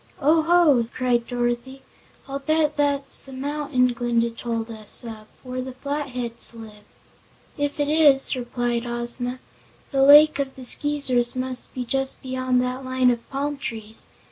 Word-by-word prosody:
"Oh, 315 +3 +3
ho!" 315 -8 +3
cried 245 -2 0
Dorothy; 245 +2 -3 0.4
"I'll 275 0 -4
bet 305 +1 0
that's 285 -1 0
the 270 - -12
mountain 275 -2 -1
Glinda 235 -1 0
told 230 0 -5
us 215 0 +1
of, 220 -2 -9 0.2
where 255 0 -5
the 260 0 -7
Flatheads 255 -4 -3
live." 215 -2 -12 0.7
"If 290 0 -3
it 290 - +1
is," 295 -3 +4
replied 240 -1 -3
Ozma, 240 +1 -2 0.5
"the 270 -2 +1
Lake 295 +2 +7
of 270 -1 -3
the 260 - -7
Skeezers 260 -3 +4
must 255 0 -5
be 250 -1 -4
just 270 +2 -2
beyond 255 -1 0
the 250 +1 -4
line 255 -1 +2
of 235 -1 -5
palm 285 +1 -3
trees. 225 -5 -7
255 Hz, 150 wpm, -23 LUFS, 240-280 Hz, 0.7 s, Lake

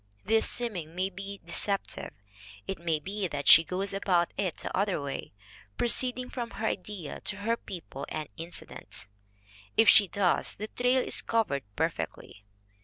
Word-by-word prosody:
This 220 +2 +3
seeming 180 -10 -2
may 190 +2 0
be 200 +1 -7
de 170 - -10
ceptive. 200 -1 -1 0.6
It 195 - -3
may 165 -2 +1
be 195 +5 -3
that 145 -3 -4
she 165 - +10
goes 190 +4 -2
about 180 -3 +2
it 185 -5 -1
the - - -5
other 195 -2 +1
way, 140 -1 -5 0.5
proceeding 250 +1 +2
from 240 -2 -3
her 220 - -2
idea 190 -6 -3
to - - -1
her 225 +3 +1
people 165 -10 -8
and 155 -1 -4
incidents. 165 -10 -7 0.7
If 225 - +6
she 205 - +8
does, 185 -1 +2
the 215 +2 -6
trail 250 +1 +2
is - - +1
covered 220 -12 +1
perfectly. 100 - -3
195 Hz, 160 wpm, -29 LUFS, 170-220 Hz, 0.7 s, she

